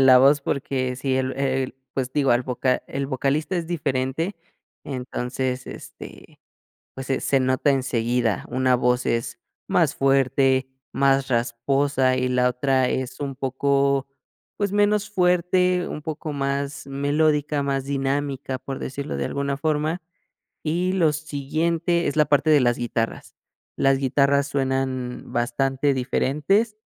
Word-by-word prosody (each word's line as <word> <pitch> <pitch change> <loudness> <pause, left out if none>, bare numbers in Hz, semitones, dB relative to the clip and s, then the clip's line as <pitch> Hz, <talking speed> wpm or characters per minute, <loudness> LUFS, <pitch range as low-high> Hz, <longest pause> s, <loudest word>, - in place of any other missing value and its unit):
la 130 -1 +8
voz, 140 +3 +5
porque 130 -2 -2
si 130 0 -1
el 130 0 0
el, 135 -1 -1 0.2
pues, 130 -1 -2
digo, 140 -2 +2
al 120 +1 +3
voca 125 0 0
el 135 0 -3
vocalista 140 +6 -1
es 170 -2 -2
diferente, 145 +2 -1 0.5
entonces 130 -1 -3
este, - - -11 0.5
pues, 130 0 -7
se 135 - 0
se 135 - +2
nota 130 +2 +2
enseguida. 120 -4 0
Una 130 +1 +2
voz 125 0 +1
es 115 0 -1 0.3
más - - +2
fuerte, 135 -1 +2 0.2
más 135 0 +2
rasposa 130 +2 +1
y 130 0 0
la 125 0 +2
otra 130 0 +1
es 130 +1 -3
un 140 -2 -4
poco, 140 0 +1 0.5
pues, 200 -1 -1
menos 205 0 +2
fuerte, 180 -1 +2
un - - -5
poco 155 0 -5
más 140 0 -2
melódica, 145 +1 +1
más 135 -1 -1
dinámica, 135 -1 -2
por 135 +1 -6
decirlo 140 +2 -5
de - - -1
alguna 140 0 -2
forma. 155 +3 0 0.6
Y 175 +4 0
lo 165 -5 +3
siguiente 160 +3 -1
es - - -2
la 155 -1 +4
parte 145 +2 +2
de 150 - +6
las 120 -2 +2
guitarras. 115 -1 -3 0.4
Las 135 0 +3
guitarras 140 +1 +2
suenan 130 -2 -2
bastante 135 +4 0
diferentes 150 - +1
135 Hz, 140 wpm, -23 LUFS, 130-150 Hz, 0.6 s, la